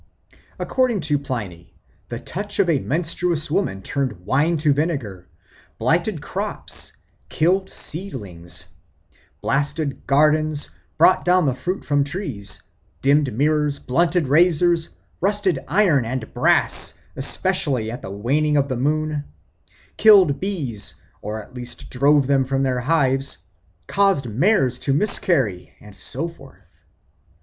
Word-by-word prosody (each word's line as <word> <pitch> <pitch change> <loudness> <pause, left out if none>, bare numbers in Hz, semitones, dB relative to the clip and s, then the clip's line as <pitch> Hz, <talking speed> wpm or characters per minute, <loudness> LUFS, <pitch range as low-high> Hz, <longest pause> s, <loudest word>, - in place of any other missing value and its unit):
According 250 -6 0
to 150 -2 0
Pliny, 100 -11 -6 0.3
the - - -4
touch 205 +3 -5
of 200 - +3
a 145 - +2
menstruous 165 +1 -1
woman 155 - -1
turned 125 -11 -3
wine 155 +8 +2
to 150 -1 +3
vinegar, 140 - -3 0.5
blighted - - 0
crops, - - -3 0.4
killed 190 +4 +1
seedlings, 95 - -4 0.8
blasted 145 +1 -1
gardens, 150 +1 +2 0.3
brought 185 - +5
down 180 -1 +3
the 135 - +2
fruit 175 +10 -4
from 145 -1 +2
trees, 140 - -4 0.4
dimmed 140 0 +3
mirrors, 150 +4 +1
blunted 170 +4 +1
razors, 170 +2 +3 0.3
rusted 195 -5 +1
iron 175 - +3
and 120 0 -5
brass - - +2 0.2
(especially 135 - 0
at 120 - -7
the - - -7
waning 140 +10 +1
of 140 0 +1
the 130 - -2
moon), 150 +2 -1 0.7
killed 190 -10 +6
bees, 140 - -3 0.3
or 110 +1 -5
at - - -19
least 125 -1 -7
drove 140 +2 +3
them 135 0 +3
from 135 +1 -1
their 130 -2 0
hives, 135 -1 +1 0.5
caused 195 -8 +2
mares 130 - +2
to 135 +1 0
miscarry, 135 - +1
and 105 -1 -14
so 160 - -2
forth. 150 -5 -16
145 Hz, 125 wpm, -22 LUFS, 125-170 Hz, 0.8 s, killed